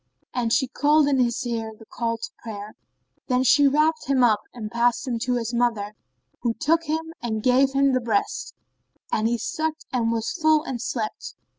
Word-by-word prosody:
and 240 -2 -1
she 245 +4 +3
called 295 +3 +3
in 275 -2 +2
his 240 0 +1
ear 225 -2 -3
the 225 - -15
call 230 +1 -2
to 225 - -7
prayer. 210 -2 -7 0.5
Then 250 0 +2
she 285 +3 +5
wrapped 310 +3 +2
him 270 -2 +3
up 215 -3 +4
and 215 -3 -7
passed 240 +4 +1
him 235 -2 -1
to 250 +2 0
his 235 0 -2
mother, 230 -4 0 0.5
who 235 -2 0
took 330 +2 +1
him 320 +1 -3
and 220 -2 -3
gave 265 +2 +4
him 275 0 +3
the 255 - +1
breast; 230 - -1 0.6
and 220 +1 +1
he 235 +1 0
sucked 315 +6 -3
and 230 -2 +1
was 230 -1 -1
full 315 -2 +3
and 250 -6 -5
slept. 225 -3 -4
245 Hz, 190 wpm, -24 LUFS, 230-280 Hz, 0.6 s, she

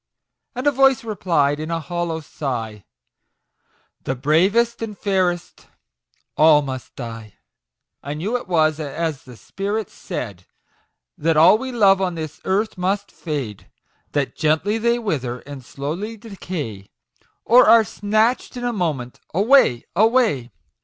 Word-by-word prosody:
And 255 +3 -4
a 290 - +5
voice 270 -2 +3
replied, 165 -9 0
in 155 +1 -5
a 165 0 -1
hollow 165 0 -3
sigh, 115 -9 -5 0.6
" - - -44
The 130 - -1
bravest 195 - +2
and 215 -3 -5
fairest, 185 -3 -1 0.7
all 155 +1 +6
all 150 - +4
must 130 -2 -7
die! 115 -4 -8 0.3
" - - -61
I 145 +2 -4
knew 195 +10 -2
it 245 - -3
was 155 -3 +2
as 155 0 -3
the 125 -2 -12
spirit 200 - -4
said, 100 -7 -7 0.7
That 160 +1 +1
all 180 +7 +7
we 260 +1 -5
love 195 -5 +4
on 180 -2 -1
this 155 -2 -7
earth 200 +1 0
must 195 +2 -1
fade; 140 - -5 0.4
That 145 -2 -1
gently 160 +8 +1
they 235 +1 +2
wither, 130 - -3
and 140 -2 -10
slowly 165 - -5
decay, 165 - -7 0.6
Or 240 -1 +6
are 230 0 +7
snatch'd 215 +5 0
in 245 - -5
a 245 -1 -1
moment 150 - -3 0.2
away, 205 - +4
away 220 - +2
170 Hz, 145 wpm, -21 LUFS, 140-215 Hz, 0.7 s, all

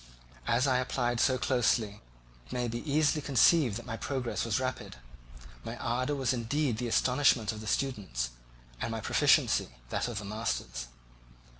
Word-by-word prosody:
As 120 +3 +3
I 130 -2 +3
applied 120 -1 -1
so 130 +1 +3
closely, 115 -5 +1 0.5
it - - -15
may 125 -1 -1
be 120 +1 -3
easily 150 +1 +3
conceived 140 - +4
that 120 - -9
my 115 -2 -5
progress 130 +2 -2
was 115 +1 0
rapid. 130 0 -4 0.7
My 115 - -6
ardour 125 +5 -1
was 130 -3 0
indeed 125 0 -1
the 125 - -2
astonishment 125 -2 +3
of 110 -1 -7
the 110 - -8
students, 95 - -1 0.5
and - - -1
my 115 0 -3
proficiency - - +3 0.2
that - - -1
of 120 -3 -5
the 105 - -4
masters. 105 - -3
120 Hz, 160 wpm, -30 LUFS, 110-130 Hz, 0.7 s, conceived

